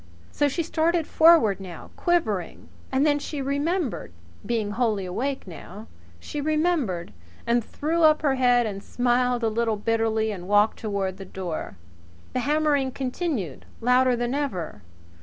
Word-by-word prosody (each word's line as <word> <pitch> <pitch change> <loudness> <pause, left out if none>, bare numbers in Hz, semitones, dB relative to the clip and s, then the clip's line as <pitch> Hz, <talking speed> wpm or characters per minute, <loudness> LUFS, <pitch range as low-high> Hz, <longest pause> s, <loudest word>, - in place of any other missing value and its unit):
So 290 - +2
she 310 +5 -1
started 330 0 +1
forward 315 - +5
now, 185 -3 -9
quivering. 225 - -1 0.2
And 270 +2 +2
then 290 -1 +3
she 290 0 -5
remembered, 285 - -1 0.3
being 220 -3 -1
wholly 215 -4 0
awake 265 +10 -3
now 195 +4 -10 0.3
she 295 - -5
remembered, 305 - 0 0.3
and 235 0 +2
threw 320 +8 -2
up 310 -1 +5
her 280 -3 +3
head 245 -2 +3
and 200 -2 -4
smiled 245 +1 +1
a - - +3
little 225 0 0
bitterly 220 0 0
and 180 -3 -7
walked 205 +2 +3
toward 200 -3 -2
the 195 - -8
door. 175 - -5 0.6
The - - 0
hammering 290 0 +1
continued, 255 - -3
louder 250 +1 +3
than 240 +1 -2
ever. 190 - -3
245 Hz, 145 wpm, -25 LUFS, 205-290 Hz, 0.6 s, forward